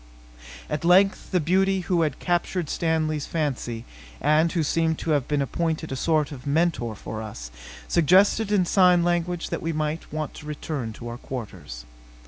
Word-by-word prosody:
At 150 - -3
length 190 +3 +4
the 185 - +2
beauty 190 +4 +2
who 175 -1 +1
had 155 -4 +1
so - - -19
captured 175 -2 0
Stanley's 155 -3 0
fancy, 130 -7 -3 0.3
and 155 +3 +3
who 165 - 0
seemed 160 +1 +1
to 165 - -2
have 145 -4 +1
been 145 -2 +1
appointed 160 +2 -2
a - - -2
sort 155 +1 +1
of 140 -1 -9
mentor 145 -7 +1
for 110 +2 -6
us, - - -8 0.4
suggested 195 +6 +4
in 195 -3 +3
sign 180 -1 +4
language 175 0 -1
that - - -2
we 165 0 -2
might 155 +1 -3
want 155 -1 -4
to 150 - -11
return 145 -5 -4
to 120 +2 -9
our 120 +1 -6
quarters. 90 - -7
155 Hz, 175 wpm, -25 LUFS, 140-175 Hz, 0.4 s, length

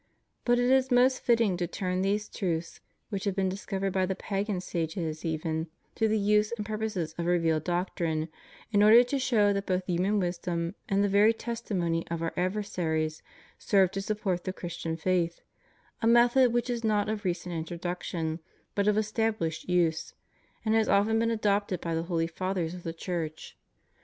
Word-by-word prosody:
But 245 0 +4
it 245 +1 +2
is 265 0 +4
most 255 +1 +4
fitting 230 -6 +2
to 175 -1 -1
turn 185 +1 -2
these 205 +2 0
truths, 170 -4 -3 0.3
which 200 -2 -3
have 200 -2 0
been 190 -1 +1
discovered 195 0 -3
by 185 -1 +1
the 190 - -1
pagan 195 0 -2
sages 165 -2 -3
even, 160 0 -2 0.3
to 225 - +1
the 220 0 +2
use 210 +1 +2
and 210 - -4
purposes 210 -6 -3
of 170 - -1
revealed 165 -3 +2
doctrine, 175 -3 -1 0.4
in 205 -1 +4
order 220 +3 +8
to 270 +3 -2
show 215 -6 +3
that 200 0 -3
both 185 0 0
human 185 +4 +1
wisdom 175 -1 -2 0.2
and 200 +1 +2
the - - +3
very 205 +3 +5
testimony 195 -8 -2
of 165 0 -3
our 165 - -2
adversaries 175 -5 -1 0.4
serve 190 -3 +3
to 195 - -3
support 195 -4 -2
the 185 - -3
Christian 170 -2 -5
faith 170 0 0 0.3
— - - -35
a 225 - +2
method 240 +2 +5
Avhich 240 +1 0
is 235 -1 -3
not 210 -2 +2
of 215 0 -3
recent 175 -1 -2
introduction, 165 -1 -3 0.3
but 200 0 0
of 210 - +4
estabhshed 215 -6 -1
use, 170 -3 +1 0.5
and 220 - +2
has 225 -1 +3
often 220 +3 +3
been 230 0 +2
adopted 205 -4 0
by 165 -1 -3
the 165 - 0
holy 165 -2 +1
Fathers 180 0 -2
of 180 - -8
the 165 - -4
Church. 165 -2 -5
190 Hz, 180 wpm, -29 LUFS, 170-215 Hz, 0.5 s, order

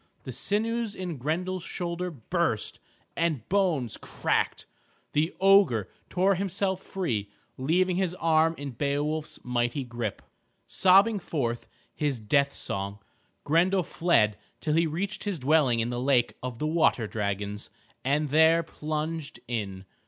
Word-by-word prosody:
The - - -6
sinews 225 +1 0
in 180 -5 -4
Grendel's 175 +7 -2
shoulder 175 +1 -3
burst, 135 -10 -2 0.4
the 165 -4 +1
bones 170 - +1
cracked. - - -1 0.5
The 155 +3 +2
ogre 190 - +5 0.2
tore 190 +2 +3
himself 190 0 -1
free, 120 - -2 0.3
leaving 175 +7 +1
his 185 -2 0
arm 165 -1 +3
in 140 -1 -5
Beowulf's 145 +4 -2
mighty 125 +2 0
grip. 120 -4 -4 0.4
Sobbing 200 +3 +5
forth 120 -9 -2 0.3
his 145 -5 -1
death 140 +6 +2
song, 100 +1 -4 0.5
Grendel 180 +5 +3
fled 110 - +2 0.2
till 155 - -1
he 165 +1 +3
reached 195 +8 -3
his 200 -4 -1
dwelling 135 -4 +3
in 115 - -1
the 120 0 -2
lake 130 -2 +2
of 125 -2 -5
the 150 - -2
water 155 -7 +2
dragons, 105 -1 -3 0.3
and 145 +3 +1
there 160 +3 +5
plunged 155 0 -4
in. 100 -5 -4
155 Hz, 130 wpm, -28 LUFS, 120-180 Hz, 0.5 s, ogre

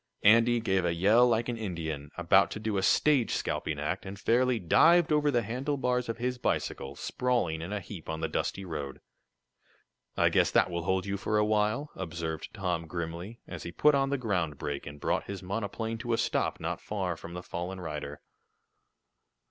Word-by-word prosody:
Andy 115 +3 +6
gave 95 -5 +1
a 85 -1 0
yell 105 +8 +5
like 115 -1 +1
an 120 -1 -2
Indian, 80 -8 -4
about 90 +3 +4
to - - -6
do 110 -1 -2
a 95 - +1
stage 135 +5 +3
scalping 75 -2 -2
act, 75 +6 -2
and 95 +1 -7
fairly 125 +3 +2
dived 165 - +5
over 150 -1 +3
the 120 -4 +2
handlebars 125 +1 -1
of 115 - -2
his 125 +1 -2
bicycle, 70 - -2
sprawling 120 -11 -1
in 85 +4 -6
a 105 - -1
heap 90 -3 -9
on 80 0 -3
the 80 - -1
dusty 95 +4 -2
road. 75 -5 -5 1.2
"I - - +4
guess - - +3
that - - +3
will 85 0 -3
hold 95 0 +1
you 100 0 -2
for 105 +2 0
a 105 - +3
while," 110 +7 +1
observed 80 -3 -4
Tom, 90 -5 -2
grimly, 85 +7 -5
as 85 -3 -7
he 85 - -6
put 150 +11 +4
on 135 -1 +2
the 140 - 0
ground 90 - -1
brake 70 0 -4
and 75 0 -8
brought - - 0
his 100 -1 -6
monoplane 110 +3 -3
to 120 0 -2
a - - +2
stop - - 0
not - - -3
far 95 -4 -2
from 85 +1 -9
the 90 - -6
fallen 90 +2 -5
rider. 75 -4 -6
100 Hz, 195 wpm, -29 LUFS, 85-115 Hz, 1.2 s, Andy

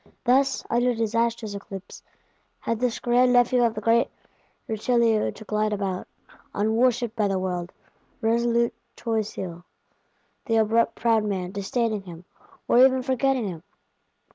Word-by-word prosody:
Thus, 270 +2 +2
under 245 +1 +1
disastrous 230 -1 -1
eclipse, 195 -1 -9 0.6
had 230 -1 -2
this 250 -1 0
grand 245 +1 +3
nephew 245 0 +4
of 230 -1 +1
the 215 - -4
great 230 +2 +3 0.6
Richelieu 225 0 +2
to 220 - -12
glide 215 0 0
about; 195 -2 -3 0.5
unworshipped 235 +2 +1
by 215 -3 +1
the 195 -1 0
world; 180 -1 -3 0.5
resolute 235 +1 +1 0.2
Choiseul, 210 -7 -3 0.8
the 225 - 0
abrupt 225 +1 +2
proud 225 -2 +2
man, 190 -3 -3
disdaining 215 +2 -1
him, 175 -2 -11 0.4
or 240 - +4
even 260 -1 +4
forgetting 260 -2 +1
him. 170 -4 -6
225 Hz, 130 wpm, -25 LUFS, 205-240 Hz, 0.8 s, nephew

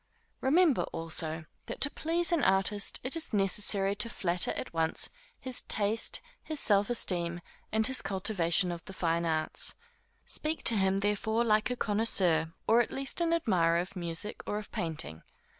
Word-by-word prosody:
Remember, 295 - +3
also, 160 -1 -1 0.2
that - - -6
to 285 - +3
please 340 +2 0
an 335 -4 +2
artist, 195 +2 +1
it 255 +4 +1
is 320 -6 -4
necessary 195 0 +2
to 230 - +1
flatter 175 -5 0
at - - -6
once 160 -1 0 0.3
his 255 -1 -3
taste, 215 +2 -1 0.2
his 310 -2 -3
self 200 0 +3
esteem, 175 -7 +1 0.3
and 220 0 +2
his 260 +2 +2
cultivation 185 -2 +1
of 170 -1 -6
the 190 - -9
fine 170 -2 0
arts. 155 -1 -1 0.5
Speak 310 +1 -1
to 230 - +5
him 195 -1 +2
therefore 220 +3 +1
like 215 -1 +2
a 250 - -1
connoisseur, 190 -8 +2 0.2
or 230 +2 +5
at 235 - -2
least 275 +5 -2
an 335 -1 +1
admirer 185 - +2
of 185 +3 -3
music, 170 +3 -3
or 205 - -1
of 210 - -7
painting. 155 - -3
200 Hz, 165 wpm, -30 LUFS, 170-235 Hz, 0.5 s, to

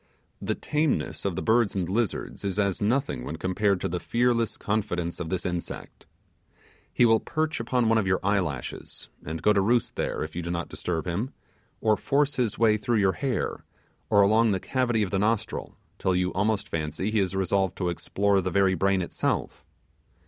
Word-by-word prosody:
The - - -1
tameness 150 -7 -1
of 95 -3 0
the - - -3
birds 115 -2 +3
and 90 -3 -1
lizards 105 +3 -2
is 100 -1 -2
as 100 -2 +1
nothing 120 - 0
when 75 - -5
compared 95 +3 +1
to - - 0
the 90 +1 -2
fearless 120 0 +1
confidence 95 -5 -2
of 85 -2 -4
this 90 0 -2
insect. 90 -1 -5 0.8
He 120 - +4
will 115 -1 +5
perch 155 +3 -2
upon 120 0 +1
one 115 0 +4
of 100 - -1
your 95 -1 +2
eye 100 +1 +3
lashes, 75 -9 -5
and 80 +1 -5
go 105 - +5
to 100 - +3
roost 120 +4 +1
there - - -1
if 80 0 -7
you 90 - -2
do 85 - -5
not 85 0 -3
disturb 80 -3 -3
him, 100 +10 -2 0.5
or 110 -1 +4
force 145 +6 +1
his 120 -5 0
way 110 -1 +4
through 110 +2 0
your 100 -2 +4
hair, 135 -5 -2 0.5
or 100 - +6
along 110 +3 +4
the 95 - 0
cavity 120 -1 0
of 95 - -3
the 95 - +1
nostril, 110 +1 -1 0.2
till 95 - +1
you 90 0 0
almost 105 +1 0
fancy 80 +6 -2
he 110 - +2
is 95 -1 0
resolved 95 0 +1
to 90 -2 0
explore 100 +3 +1
the 95 - -1
very 95 0 +3
brain 95 +1 +2
itself. - - -2
100 Hz, 195 wpm, -27 LUFS, 90-115 Hz, 0.8 s, or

